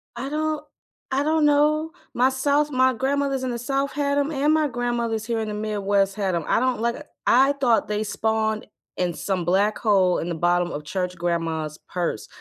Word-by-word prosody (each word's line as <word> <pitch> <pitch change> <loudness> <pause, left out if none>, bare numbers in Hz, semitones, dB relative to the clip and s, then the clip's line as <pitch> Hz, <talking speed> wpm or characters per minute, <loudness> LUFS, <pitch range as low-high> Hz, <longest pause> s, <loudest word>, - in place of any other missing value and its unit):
I 265 +3 -4
don't 310 0 -1 0.5
I 275 +2 +1
don't 310 0 +2
know. 300 +2 +3 0.2
My 255 +2 +3
south 285 +3 +1
my 260 0 +3
grandmothers 270 +1 -1
in 255 - -1
the 235 - -4
South 275 +3 -1
had 285 -1 0
'em, 285 +2 +1
and 295 +2 +2
my 310 -1 +3
grandmothers 235 -3 -2
here 230 -1 -1
in 220 - -2
the - - -4
Midwest 200 -2 0
had 195 -4 -1
'em. 165 - -1
I - - +3
don't 255 -2 0
like 235 +5 -2 0.2
I 270 +3 +5
thought 250 -5 +2
they 210 0 -1
spawned 220 0 -1 0.3
in 180 -1 0
some 185 -1 -2
black 200 +4 +2
hole 190 -5 +3
in 165 - -3
the 170 - -2
bottom 175 +1 +1
of 150 - -5
church 180 +3 -3
grandma's 165 -3 -2
purse. 175 -11 -2
235 Hz, 200 wpm, -24 LUFS, 195-280 Hz, 0.5 s, I